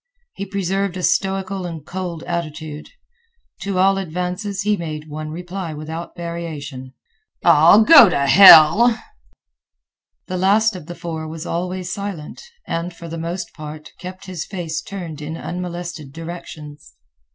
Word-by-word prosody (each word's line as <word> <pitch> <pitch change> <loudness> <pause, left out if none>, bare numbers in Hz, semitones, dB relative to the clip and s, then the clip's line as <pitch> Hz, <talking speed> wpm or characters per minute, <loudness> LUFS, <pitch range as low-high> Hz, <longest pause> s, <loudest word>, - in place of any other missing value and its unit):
He 200 - -6
preserved 195 -1 -2
a 180 - -5
stoical 195 0 0
and 160 -4 -8
cold 180 -3 -5
attitude. 155 -3 -5 0.7
To 195 -1 -3
all 195 +1 +3
advances 180 +3 -3
he 210 0 +2
made 155 -4 -6
one 155 0 -6
reply 175 0 -6
without 160 +3 -7
variation, 150 -7 -6 0.5
"Ah, 165 +2 +7
go 285 - +9
t' - - -1
hell!" 170 - +8 1.3
The 185 - -4
last 205 +3 +3
of 170 -4 -9
the 175 - -7
four 160 -2 -5
was 160 +1 -7
always 180 +1 -3
silent 200 -7 -6 0.2
and, 170 +2 -3
for 170 - -10
the 165 0 -6
most 170 +3 -5
part, 155 -1 -9
kept 185 +1 -9
his 180 -4 -5
face 170 -4 -4
turned 170 -6 -7
in 160 +2 -5
unmolested 175 -5 -6
directions. 155 -2 -9
170 Hz, 140 wpm, -20 LUFS, 155-190 Hz, 1.3 s, go